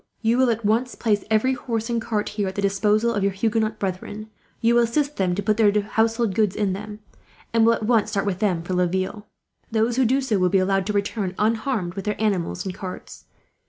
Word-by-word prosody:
"You 230 +3 +2
will 260 -1 +4
at 230 -1 -1
once 235 +4 +1
place 210 -4 0
every 220 +4 +2
horse 230 -3 -3
and 235 -2 -1
cart 215 -2 -2
here 205 -2 -2
at 190 - -5
the 200 - -2
disposal 210 +3 +2
of 205 - -1
your 200 0 +2
Huguenot 220 +2 0
brethren. 205 +3 -5 0.3
You 230 +1 +3
will 240 - +5
assist 285 +5 0
them 185 -2 +1
to 200 - -3
put 215 +2 +1
their 215 -3 +5
household 225 +1 0
goods 210 -2 +1
in 200 -3 0
them, 210 +2 -7 0.5
and 225 -1 +4
will 230 - +6
at 220 - -4
once 220 -2 +2
start 200 -2 -1
with 190 -3 -2
them 185 -6 0
for 185 - -4
Laville. 185 +4 -1 0.4
Those 225 +2 +1
who 260 - +4
do 260 +4 +3
so 235 -7 0
will 180 0 +3
be 195 - +3
allowed 190 0 +1
to 210 - -1
return, 200 -2 -2
unharmed, 220 -4 0
with 195 0 -6
their 210 - -2
animals 190 - -1
and 190 - -3
carts. 185 -1 -8
210 Hz, 230 wpm, -23 LUFS, 195-230 Hz, 0.5 s, will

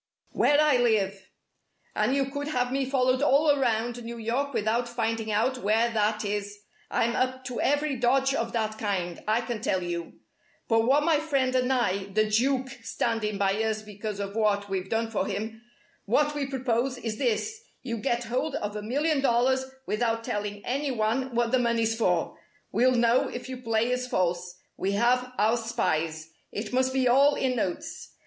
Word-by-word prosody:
"Where 290 0 +3
I 300 -4 +5
live. 200 -5 +1 0.7
And 215 +6 +2
you 275 -1 +2
could 285 +1 -4
have 250 -4 0
me 270 0 0
followed 255 -1 +2
all 290 +2 +4
around 240 -3 0
New 235 +1 -6
York 240 +5 -1
without 230 +1 0
finding 225 -2 -2
out 245 +5 +1
where 225 +2 +2
that 215 -1 0
is. 205 0 -3 0.3
I'm 235 +1 +1
up 260 0 -1
to 250 -1 -3
every 290 0 +1
dodge 265 +3 +2
of 230 -3 -1
that 220 -2 -2
kind, 185 -5 -2
I 220 +2 +2
can 235 -2 -4
tell 185 -4 0
you! 170 -1 -4 0.5
But 225 0 +3
what 285 +3 +4
my 315 -2 +3
friend 275 -4 0
and 255 0 +2
I 200 -7 +1
the 215 +2 +1
Duke 260 +4 +1
standing 225 -2 -1
by 195 +2 +1
us 215 -1 -1
because 210 0 -6
of 200 0 -4
what 205 -2 +1
we've 190 -1 -3
done 225 0 -1
for 200 -3 -1
him 220 +2 -4 0.4
what 295 +8 +2
we 290 -2 -2
propose, 255 -1 -1
is 225 -3 -4
this: 270 - -1 0.2
you 235 -3 -3
get 240 +1 -1
hold 260 +6 -2
of 210 -5 -3
a 210 - -3
million 285 +7 0
dollars 260 +1 +2 0.2
without 230 +1 0
telling 205 -3 -4
any 280 +3 -1
one 240 +2 -1
what 235 -1 +1
the 255 - +3
money's 230 -2 +1
for. 180 -7 0 0.4
We'll 250 +5 +3
know 235 +1 +3
if 245 +1 -6
you 260 0 -5
play 230 0 0
us 250 0 -2
false. 180 -4 -1 0.2
We 195 +1 -1
have 250 +4 +2
our 220 +3 +3
spies. 160 -8 -2 0.2
It 210 +2 -5
must 260 +1 +2
be 260 -1 +2
all 280 +4 +5
in 255 -1 0
notes. 185 -6 -4
235 Hz, 185 wpm, -27 LUFS, 215-260 Hz, 0.7 s, I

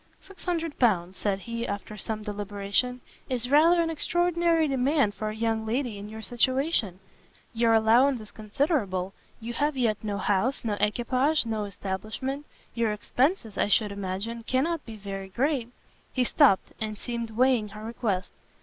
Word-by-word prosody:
"Six 390 - -15
hundred 330 -3 -2
pounds," 190 -7 +2
said 195 -1 -1
he, 230 +3 -4
after 200 +1 -5
some 215 +1 -4
deliberation, 205 +4 -1 0.3
"is 250 0 -2
rather 335 +4 +6
an 325 - -1
extraordinary 340 0 +2
demand 270 -4 +2
for 215 +1 -3
a 215 - -5
young 225 0 0
lady 230 -1 -2
in 205 +1 -8
your 220 0 -8
situation; 245 - +1 0.5
your 230 0 +3
allowance 240 +4 +4
is 215 -1 -8
considerable, 210 - -1 0.3
you 230 +1 -5
have 290 +3 0
yet 225 -4 +1
no 205 -2 -2
house, 210 +6 0
no 215 - 0
equipage, 255 +7 +2
no 220 -2 -2
establishment; 215 +9 -4 0.3
your 230 -2 +1
expences, 235 - 0
I - - +3
should 210 0 +3
imagine, 200 +4 -4
cannot 285 +7 0
be 225 - -7
very 195 -2 -6
great 250 +2 0 0.2
" - - -35
He 255 - +2
stopt, 250 - +4
and 215 -1 -3
seemed 235 +1 -4
weighing 240 -1 +2
her 210 +1 -10
request. 220 -4 -2
230 Hz, 160 wpm, -27 LUFS, 210-265 Hz, 0.5 s, rather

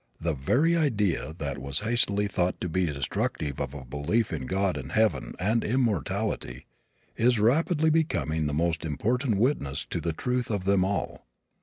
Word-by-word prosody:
The 85 0 -1
very 130 - +2
idea 105 - 0
that 70 -4 -4
was 70 +4 -2
hastily 105 -2 +2
thought 90 -3 -1
to - - -2
be 90 +1 0
destructive 70 0 -2
of 65 - -4
a 65 -3 -8
belief 70 - -1
in 70 -5 -4
God 95 -1 0
and - - -6
heaven 110 - +1
and 110 +5 +1
immortality 105 - -1 0.5
is 120 +1 +3
rapidly 155 - +3
becoming 80 - +1
the - - -1
most 85 0 0
important 110 - 0
witness 100 - 0
to - - -2
the 85 - -1
truth 125 +9 -2
of 100 -4 -2
them 100 -1 +3
all. 100 -9 -3
100 Hz, 165 wpm, -27 LUFS, 75-120 Hz, 0.5 s, is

